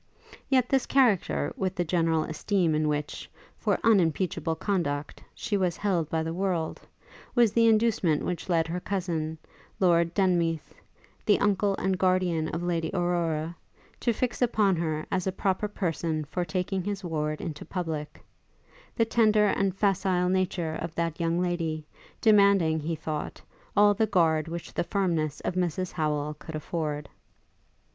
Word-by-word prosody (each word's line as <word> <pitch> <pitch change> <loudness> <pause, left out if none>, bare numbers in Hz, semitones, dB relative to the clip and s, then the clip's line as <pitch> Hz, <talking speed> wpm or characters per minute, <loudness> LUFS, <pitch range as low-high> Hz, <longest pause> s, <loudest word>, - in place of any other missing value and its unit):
Yet 260 -3 +3
this 265 -1 +1
character, 195 - +2
with 190 -1 -2
the 175 -2 -1
general 165 -2 +1
esteem 170 +1 0
in 155 0 +1
which, 150 0 -3 0.3
for - - +1
unimpeachable 180 -5 +2
conduct, 160 -6 -2
she 210 - -2
was 180 -3 0
held 180 -7 0
by 160 -1 0
the 165 0 -3
world, 180 -3 -2 0.5
was 235 -4 +4
the 230 0 +4
inducement 215 -8 +2
which 180 0 -4
led 165 -2 +2
her 175 +2 -3
cousin, 170 -5 -2 0.4
Lord 170 -2 +3
Denmeath, 170 -5 +1 0.5
the 205 - +3
uncle 200 -1 +2
and 190 -1 0
guardian 185 -4 +2
of 165 +2 -4
Lady 165 -2 -1
Aurora, 170 -2 0 0.4
to 240 - +1
fix 245 +3 -2
upon 215 -5 +3
her 155 -2 -2
as 190 -1 0
a - - +1
proper 190 +2 -1
person 165 -6 -2
for 175 +5 -2
taking 180 +3 -2
his 200 0 -4
ward 155 -3 -2
into 155 -4 -5
public; 160 -4 -5 0.7
the 230 - +3
tender 215 -2 +4
and 195 -2 0
facile 190 -2 +1
nature 180 -3 0
of 165 -1 -5
that 165 -1 -2
young 170 0 +1
lady, 165 -3 -1 0.4
demanding, 200 -7 +5
he 160 +2 -2
thought, 155 -1 -5 0.4
all 205 0 +6
the 220 +2 +1
guard 165 -5 +2
which 170 +1 -6
the - - 0
firmness 170 -7 -1
of - - -2
Mrs 180 0 -1
Howel 150 -2 -1
could 160 - -8
afford. 150 -2 -3
175 Hz, 150 wpm, -27 LUFS, 160-195 Hz, 0.7 s, all